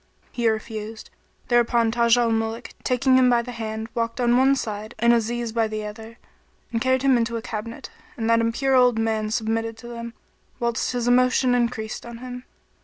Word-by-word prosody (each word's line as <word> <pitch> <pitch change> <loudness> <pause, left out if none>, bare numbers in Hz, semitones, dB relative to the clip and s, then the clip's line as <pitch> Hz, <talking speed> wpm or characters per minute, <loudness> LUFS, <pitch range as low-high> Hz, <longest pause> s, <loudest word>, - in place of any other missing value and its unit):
He 235 -2 +1
refused, 220 0 -5 0.4
whereupon 235 -1 +3
Taj 235 0 +3
al 235 -1 +2
Muluk 225 +1 -2
taking 255 +1 +3
him 255 -1 +5
by 240 -1 +3
the 245 - -7
hand 220 -1 -5
walked 230 +1 -2
on 240 -1 +3
one 265 +2 +4
side 215 -2 -5
and 235 0 +4
Aziz 235 0 -1
by 225 -1 +1
the 215 0 -4
other, 220 +2 -9 0.5
and 230 -1 -1
carried 260 +1 +2
him 270 -2 +4
into 235 0 -1
a - - -5
cabinet; 225 +2 -6 0.3
and 225 -2 -2
that 230 0 +4
impure 240 +4 0
old 250 -2 +5
man 220 -1 0
submitted 225 0 -2
to 235 - -11
them, 235 0 -7 0.4
whilst 235 0 -1
his 245 -1 -1
emotion 250 +1 +3
increased 235 -3 -1
on 235 -1 -9
him. 250 +1 -8
235 Hz, 185 wpm, -23 LUFS, 225-245 Hz, 0.5 s, him